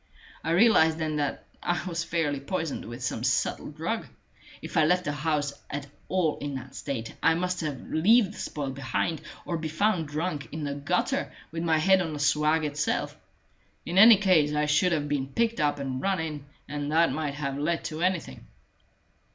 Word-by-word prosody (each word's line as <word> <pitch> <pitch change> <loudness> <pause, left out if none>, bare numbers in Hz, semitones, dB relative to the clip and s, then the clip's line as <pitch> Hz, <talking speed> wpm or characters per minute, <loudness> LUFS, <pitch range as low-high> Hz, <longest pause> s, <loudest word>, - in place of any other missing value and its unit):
I - - -2
realized 165 -4 +5
then 155 -2 -2
that 145 -1 -2 0.2
I 175 - -1
was 170 -2 -2
fairly 160 -4 -1
poisoned 160 +1 -3
with 120 +2 -7
some 120 - -2
subtle - - 0
drug. - - -3 0.5
If - - -8
I 160 - +5
left 180 +3 +3
the 145 - 0
house 145 -1 -1 0.2
at 140 0 -4 0.2
all 180 -5 +1
in 145 -1 -4
that 130 0 -7
state, 120 -5 -5
I 165 - +4
must 180 +1 -1
leave 170 - +2
the - - -11
spoil 140 -3 -3
behind, 140 +4 -2 0.2
or 170 -2 -2
be 160 - -3
found 165 0 +1
drunk 150 0 -3
in 155 0 -5
the 140 -1 -2
gutter 140 0 -1 0.2
with 165 +1 -4
my 165 -2 +2
head 190 +4 +4
on 165 -3 -3
the 150 - -5
swag 150 +2 +2
itself. 150 +1 -1 0.7
In 175 +3 +1
any 220 +1 +10
case 170 -7 +3
I 150 0 +2
should 150 +5 +3
have 150 -3 0
been 145 -2 -1
picked 230 +11 0
up 145 -1 +2
and 130 -2 -3
run 195 -2 +1
in, 150 -3 -4 0.2
and 145 0 -3
that 165 +2 +4
might 150 -2 -2
have 140 -2 -3
led 165 +3 0
to 155 0 -5
anything." 175 - -2
155 Hz, 190 wpm, -27 LUFS, 145-170 Hz, 0.7 s, any